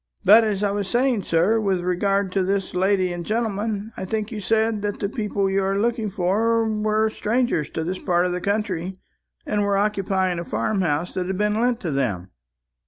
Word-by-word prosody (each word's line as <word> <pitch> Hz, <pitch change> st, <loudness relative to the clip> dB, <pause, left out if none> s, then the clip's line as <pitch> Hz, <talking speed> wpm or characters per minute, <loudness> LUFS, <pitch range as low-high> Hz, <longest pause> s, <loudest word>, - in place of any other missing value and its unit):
But 220 Hz, +4 st, +8 dB
as 210 Hz, -2 st, -1 dB
I 200 Hz, -, +2 dB
was 200 Hz, -1 st, -2 dB
saying, 240 Hz, -3 st, +1 dB
sir, 180 Hz, +7 st, +2 dB
with 195 Hz, -4 st, 0 dB
regard 195 Hz, +2 st, 0 dB
to 195 Hz, -, +1 dB
this 195 Hz, +1 st, -1 dB
lady 185 Hz, 0 st, +1 dB
and 175 Hz, 0 st, -5 dB
gentleman, 215 Hz, 0 st, -2 dB
I -, -, -6 dB
think 215 Hz, +3 st, -3 dB
you 215 Hz, -3 st, -5 dB
said 220 Hz, +1 st, +1 dB
that 205 Hz, 0 st, -3 dB
the 200 Hz, -, -1 dB
people 205 Hz, -3 st, -1 dB
you 195 Hz, +1 st, +1 dB
are 195 Hz, +1 st, 0 dB
looking 225 Hz, 0 st, 0 dB
for 215 Hz, +5 st, +1 dB
were 215 Hz, 0 st, +1 dB
strangers 220 Hz, -, 0 dB
to 160 Hz, -, -3 dB
this 185 Hz, +3 st, -3 dB
part 175 Hz, -1 st, +1 dB
of 180 Hz, -, 0 dB
the 180 Hz, 0 st, -3 dB
country, 190 Hz, -3 st, -2 dB, 0.5 s
and 210 Hz, -, 0 dB
were 200 Hz, -1 st, +1 dB
occupying 195 Hz, -3 st, 0 dB
a -, -, -3 dB
farm 205 Hz, +3 st, -1 dB
house 165 Hz, 0 st, -1 dB
that 180 Hz, -1 st, -2 dB
had 190 Hz, 0 st, -2 dB
been 210 Hz, +2 st, +1 dB
lent 245 Hz, -1 st, +1 dB
to 165 Hz, -, -2 dB
them." 100 Hz, -10 st, -2 dB
200 Hz, 205 wpm, -23 LUFS, 185-215 Hz, 0.5 s, But